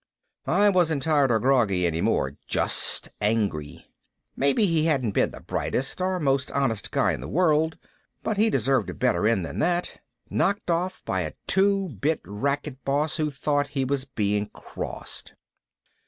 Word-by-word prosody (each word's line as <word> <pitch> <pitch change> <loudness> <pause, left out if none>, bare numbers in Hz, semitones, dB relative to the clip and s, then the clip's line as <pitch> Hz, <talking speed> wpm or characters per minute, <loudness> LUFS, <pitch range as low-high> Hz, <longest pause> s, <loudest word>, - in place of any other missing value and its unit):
I 205 +1 +4
wasn't 165 -7 +2
tired 145 -4 +3
or 110 - +3
groggy 110 -8 +2
any 85 -1 0
more. 65 +1 0
Just - - 0
angry. 105 -9 -1 0.5
Maybe 140 +10 +3
he 165 -4 +2
hadn't 135 -9 +1
been - - +2
the - - -11
brightest 135 +7 -2
or 185 0 0
most 135 -3 +1
honest 130 -7 0
guy - - +2
in - - -5
the - - -6
world. 160 -1 +2 0.5
But 215 - -1
he 220 +2 +4
deserved 135 - +1
a - - -6
better 125 -4 +1
end 105 -6 +1
than - - -6
that. 175 +2 -1 0.3
Knocked 200 -2 0
off 180 +3 -1
by 95 -1 0
a 80 -3 -4
two 195 0 +2
bit 145 +6 -1
racket 140 +5 -3
boss 145 +3 +1
who 155 -2 0
thought 145 0 0
he 135 - +2
was 135 0 -1
being 105 -5 -1
crossed. - - -7
140 Hz, 165 wpm, -25 LUFS, 115-165 Hz, 0.5 s, I